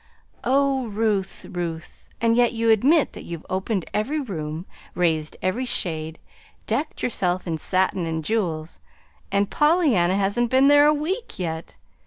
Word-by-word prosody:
"Oh, 270 0 +2
Ruth, 210 -2 -1
Ruth! 170 -3 -6
and 230 0 +3
yet 240 0 +3
you 230 0 +2
admit 275 +8 +4
that - - -8
you've 170 -2 -8
opened 190 0 -1
every 270 +9 0
room, 165 - -5 0.3
raised 160 -3 0
every 220 +8 0
shade, 160 -8 -2 0.5
decked 305 +1 -2
yourself 185 -6 0
in 165 -3 -3
satin 185 0 0
and 160 -1 -3
jewels 170 -8 -2 0.5
and 200 0 +1
Pollyanna 295 - +3
hasn't 205 +5 +1
been 265 +3 +5
there 290 0 +7
a - - +6
week 365 +11 -3
yet. 160 -2 -4
200 Hz, 145 wpm, -23 LUFS, 175-260 Hz, 0.5 s, there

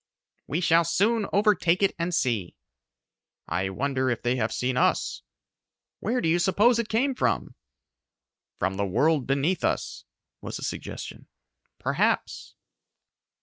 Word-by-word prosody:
"We 165 - -1
shall 170 -1 +4
soon 200 +6 +1
overtake 200 -3 +3
it 195 - +3
and 170 +1 -1
see." 115 - -1 0.9
"I 95 +3 -1
wonder 130 +5 -1
if 120 -2 -2
they 120 +1 +1
have 110 -2 -1
seen 125 0 -1
us?" 125 - +1 0.8
"Where 245 +4 -1
do - - 0
you 170 +2 +3
suppose 215 +7 +3
it 230 -1 -2
came 260 +5 +1
from?" 60 - -1 1.0
"From 95 +2 -1
the 100 0 0
world 140 - +2
beneath 140 +7 0
us," - - -2 0.4
was - - -5
the - - -8
suggestion. - - -6 0.5
"Perhaps." - - -1
165 Hz, 135 wpm, -26 LUFS, 120-200 Hz, 1.0 s, shall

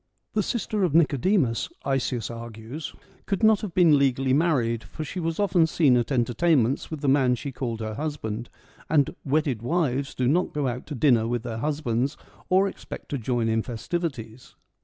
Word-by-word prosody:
The 215 - +2
sister 215 -1 -1
of 165 -5 +1
Nicodemus, 150 - +2 0.2
Isaeus 130 -4 -1
argues, 115 +5 -7 0.3
could 195 +1 -1
not 220 -2 +5
have 195 -6 -6
been 165 -5 +6
legally 135 -1 +2
married, 130 -7 +1
for 155 - -7
she 170 +5 -5
was 165 0 -2
often 185 -5 +3
seen 150 -5 +3
at 120 +2 0
entertainments 125 +2 +2
with 155 -3 -6
the 145 - -1
man 135 -2 +4
she 140 +3 -6
called 120 -3 -4
her 110 0 -3
husband, 120 -5 -4 0.4
and 145 -3 +2
' - - -45
wedded 140 -5 0
wives 140 -1 -1
do 125 - 0
not 175 +7 +1
go 145 -2 0
out 125 0 -4
to 150 - -5
dinner 120 -4 +3
with 120 -1 -2
their 115 -2 -4
husbands, 140 -1 -1 0.3
or 190 +2 +4
expect - - -8
to 140 - -2
join 120 0 0
in 110 0 +1
festivities.' 125 -2 -5
135 Hz, 180 wpm, -25 LUFS, 120-160 Hz, 0.4 s, been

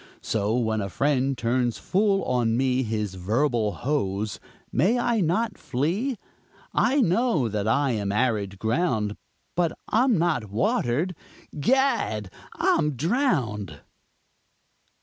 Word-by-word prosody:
So 110 +1 0
when 110 -3 0
a 100 - -3
friend 135 +3 +1
turns 120 0 0
full 195 0 +1
on 120 -2 +1
me 130 0 +2
His 105 -4 -2
verbal 110 +4 0
hose, 105 -7 -2 0.3
may 190 - +2
I 240 -2 +1
not 190 +6 0
flee? 190 - -1 0.6
I 270 +3 +3
know 185 - +2
that 105 -1 -2
I 140 +4 +2
am 100 -4 -1
arid 105 -4 0
ground, 110 - 0 0.4
But 170 -2 +1 0.2
I'm 240 0 +3
not 160 - 0
watered 120 - 0 0.4
Gad! 145 - +1 0.2
I'm 150 0 +2
drowned! 125 - -1
125 Hz, 115 wpm, -25 LUFS, 110-175 Hz, 0.6 s, I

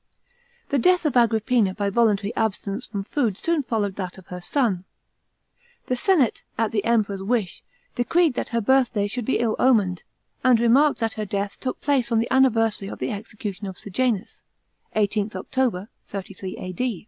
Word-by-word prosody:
The 280 - +2
death 360 +5 +3
of 295 - +1
Agrippina 225 -3 +3
by 200 -1 -1
voluntary 215 -2 +2
abstinence 210 +1 -2
from 200 -2 -4
food 220 -3 -1
soon 335 -2 0
followed 210 -7 -2
that 185 -2 -5
of 190 - -13
her 180 - -6
son. 200 -3 0 1.0
The 255 - 0
senate, 285 - +2 0.2
at 225 -2 +1
the 205 -3 0
Emperor's 210 -4 +1
wish, 205 -2 -1 0.3
decreed 320 +5 +2
that - - -3
her 235 -1 0
birthday 240 -3 +2
should 225 +3 -3
be 265 - +1
ill 230 -2 0
omened, 205 -9 +3 0.4
and 255 -3 +5
remarked 255 +5 +4
tdat 225 -1 0
her 215 - -2
death 200 0 -3
took 255 - -4
place 270 -4 +1
on 230 - +3
the 230 +1 0
anniversary 225 -6 +3
of - - -7
the 130 - -3
execution 205 -1 -6
of 190 -1 -7
Sejanus 215 0 -2 0.5
(18th 210 -1 0
October, 210 -1 -1 0.2
33 195 -1 -7
A. 185 0 -6
220 Hz, 170 wpm, -24 LUFS, 200-250 Hz, 1.0 s, and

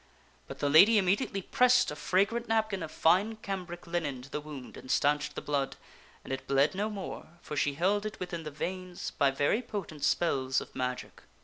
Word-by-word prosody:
But - - -8
the 145 - 0
lady 195 +10 +7
immediately 195 0 +1
pressed 250 - +4
a - - -5
fragrant 200 +9 +1
nap 220 -1 +1
kin 195 -1 -3
of 160 - -4
fine 195 +7 +3
cambric 185 -5 -6
linen 155 -7 -3
to 140 - -13
the 150 - -3
wound 145 -4 -9
and 130 - -11
stanched 150 +2 +1
the - - -5
blood, 140 -2 -1 0.5
and - - -5
it 130 0 -5
bled 140 +1 +3
no 205 +3 -1
more, 195 -5 -7
for 150 - -6
she 145 0 +1
held 195 +6 +1
it 215 - -8
within 175 -2 -4
the 155 - -6
veins 180 +4 -5
by 140 - +2
very 145 - +1
potent 190 - -6
spells 135 -5 +2
of - - -10
magic. 125 0 -4
170 Hz, 200 wpm, -30 LUFS, 145-200 Hz, 0.5 s, lady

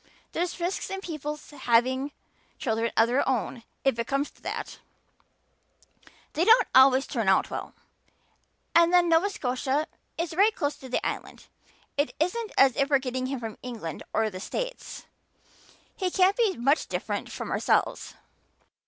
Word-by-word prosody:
There's 350 +1 -2
risks 350 +3 -2
in 385 - -4
people's 300 -4 -6
having 260 +1 +1 0.5
children 230 -2 0
of 225 - +6
their 255 +3 +1
own 245 -1 -1 0.2
if 270 -4 +1
it 235 - -1
comes 275 +1 -1
to - - -26
that - - -5 1.5
they 325 - +1
don't 460 +3 +6
always 265 +1 +6
turn - - -1
out - - +3
well. - - -6 1.0
And 335 0 +5
then 355 -1 +5
Nova 335 +4 +4
Scotia 270 -2 -1 0.3
is 335 0 -2
right 405 +5 +4
close 290 0 -1
to 260 - -11
the 250 - -1
Island. - - -5 0.5
It 285 +1 0
isn't 420 +8 -1
as 270 -2 +6
if 275 0 +2
we 285 - +4
were - - +7
getting 255 -1 -3
him 270 -1 -3
from 225 -2 -7
England 225 -11 -6
or 220 -1 +1
the 185 - -7
States. - - -5 0.9
He 375 -2 -1
can't 375 +2 +3
be 445 -6 +1
much 275 +6 +2
different - - -3
from - - -5
ourselves." - - 0
280 Hz, 160 wpm, -27 LUFS, 255-350 Hz, 1.5 s, were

